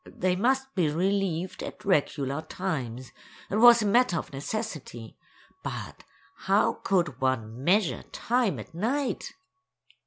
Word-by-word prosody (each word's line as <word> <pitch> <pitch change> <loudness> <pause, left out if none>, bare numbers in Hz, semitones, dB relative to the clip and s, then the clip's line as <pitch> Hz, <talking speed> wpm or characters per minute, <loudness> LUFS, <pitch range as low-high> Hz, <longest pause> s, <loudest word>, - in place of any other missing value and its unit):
They 180 0 -1
must 265 +6 +1
be 175 -6 +2
relieved 185 +1 -1
at - - -8
regular 145 -5 +1
times; 135 -9 -4 0.4
it 205 - +1
was 235 0 +8
a - - 0
matter 205 -3 +3
of 155 - -5
necessity, 140 - -5 0.5
but - - -6 0.3
how - - +2
could 170 -9 0
one 125 -2 -1
measure 190 +3 +2
time 235 - 0
at 110 - -9
night? 255 - -2
180 Hz, 125 wpm, -27 LUFS, 140-215 Hz, 0.5 s, was